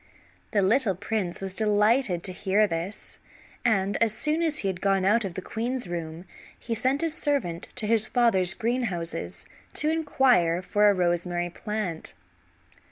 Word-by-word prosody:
The 205 -3 +1
little 215 0 +3
prince 195 -2 -3
was 190 -1 -3
delighted 210 -2 +2
to 190 - -1
hear 200 +3 +2
this, 170 +2 -5 0.4
and 200 -4 +1
as 230 -1 +4
soon 305 +8 0
as 315 -2 +1
he - - +2
had 185 -2 -3
gone 195 -1 +2
out 215 +4 +3
of 190 -3 -5
the 190 - -5
queen's 240 0 -3
room 170 0 -6 0.3
he 235 - -4
sent 260 +7 0
a 330 - +1
servant 280 - -1
to 235 - -3
his 220 0 +2
father's 190 -7 +2
greenhouses 225 -8 -3 0.3
to 305 - +2
inquire 250 - +2
for 210 +2 +3
a - - +4
rosemary 175 0 -1
plant. 210 -4 -4
205 Hz, 160 wpm, -26 LUFS, 180-240 Hz, 0.4 s, as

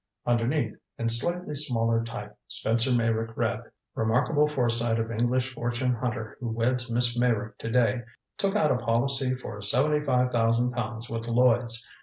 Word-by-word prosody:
Underneath, 120 +5 +1 0.2
in 115 0 -1
slightly 175 +8 +1
smaller 115 -5 +1
type, 105 -3 -7
Spencer 115 +3 +1
Meyrick 115 -1 0
read: - - 0 0.3
Remarkable 130 +7 +2
Foresight 120 -5 +1
of 115 0 -2
English 120 +3 0
Fortune 120 +1 -1
Hunter 115 -2 -4
Who 120 -3 -4
Weds 120 +2 0
Miss 120 0 +2
Meyrick 120 -3 0
To 115 - -4
Day 120 0 +2 0.4
Took 195 +1 0
Out 155 -8 +3
a - - +2
Policy 125 +3 +1
For 105 -5 -8
Seventy 150 +8 +2
Five 125 -3 +2
Thousand 115 +1 +2
Pounds 120 -1 -4
With 115 0 -5
Lloyds. 120 -1 +2
120 Hz, 155 wpm, -27 LUFS, 115-125 Hz, 0.4 s, Out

